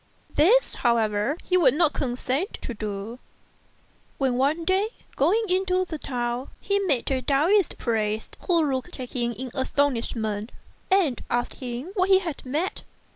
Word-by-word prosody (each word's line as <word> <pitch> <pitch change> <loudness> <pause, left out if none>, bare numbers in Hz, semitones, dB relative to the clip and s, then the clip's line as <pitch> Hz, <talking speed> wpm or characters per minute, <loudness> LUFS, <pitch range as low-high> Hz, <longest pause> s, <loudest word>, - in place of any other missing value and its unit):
This, 445 +12 +4
however, 225 +2 +2
he 365 - +2
would 280 -7 +5
not 315 -2 +3
consent 260 - -2
to 240 - -4
do; 210 +2 -5 1.0
when 265 -2 +1
one 285 +6 +1
day, 380 +4 +2 0.3
going 370 +12 +3
into 370 0 +1
the 320 -4 -6
town, 245 -1 -3
he 400 0 +1
met 290 -11 0
a 260 -1 +1
Taoist 315 - +3
priest, 220 -2 -1
who 340 -3 +4
looked 260 0 -4
at 250 -1 -6
him 240 -2 0
in 250 +3 -6
astonishment, 235 -6 -1 0.4
and 365 -10 +2
asked 240 0 0
him 250 +6 -5
what 370 -1 +1
he 380 - +8
had 340 -6 -4
met. 300 +8 -2
270 Hz, 150 wpm, -25 LUFS, 240-360 Hz, 1.0 s, he